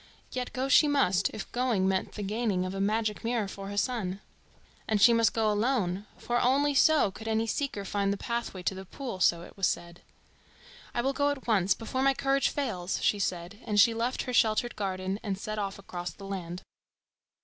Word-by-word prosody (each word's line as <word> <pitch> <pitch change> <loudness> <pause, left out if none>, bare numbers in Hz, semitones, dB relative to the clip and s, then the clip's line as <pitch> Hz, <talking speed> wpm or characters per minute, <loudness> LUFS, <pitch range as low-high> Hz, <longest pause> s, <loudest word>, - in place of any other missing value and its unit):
Yet 250 -1 -3
go 260 +1 -2
she 295 +2 +6
must, 200 -11 +2
if 215 - -7
going 240 -6 +1
meant 190 -1 0
the 210 - -5
gaining 205 -2 0
of 185 - -4
a 195 - -3
magic 215 +2 0
mirror 230 -3 0
for 195 0 -7
her 205 - -6
son. 205 -5 -1 0.7
And 215 -1 +1
she 235 +4 +7
must 230 -1 +4
go 220 -2 +1
alone, 210 -4 0
for 240 0 -1
only 285 +3 +3
so 295 -5 +4
could 220 +4 -9
any 220 0 +1
seeker 225 -3 -2
find 200 0 0
the 200 - -1
pathway 235 -5 -4
to 185 - 0
the 190 0 -7
pool, 235 0 -6
so 170 -1 +3
it - - -13
was 195 -2 +2
said. 170 0 -4 0.9
"I 240 - +1
will 270 +2 +1
go 285 +1 +2
at 285 -2 -4
once, 195 -5 +3
before 235 +3 -3
my 270 0 +3
courage 275 0 +2
fails," 195 -11 -2
she 205 - +2
said, 180 +1 -3
and 210 -3 +1
she 230 +3 +6
left 235 +3 -1
her 250 - -4
sheltered 230 +1 +2
garden 190 0 -2
and 195 -3 -3
set 215 +2 -4
off 200 -1 -3
across 180 -3 -6
the 200 - -11
land. 180 -2 -5
210 Hz, 205 wpm, -29 LUFS, 195-245 Hz, 0.9 s, she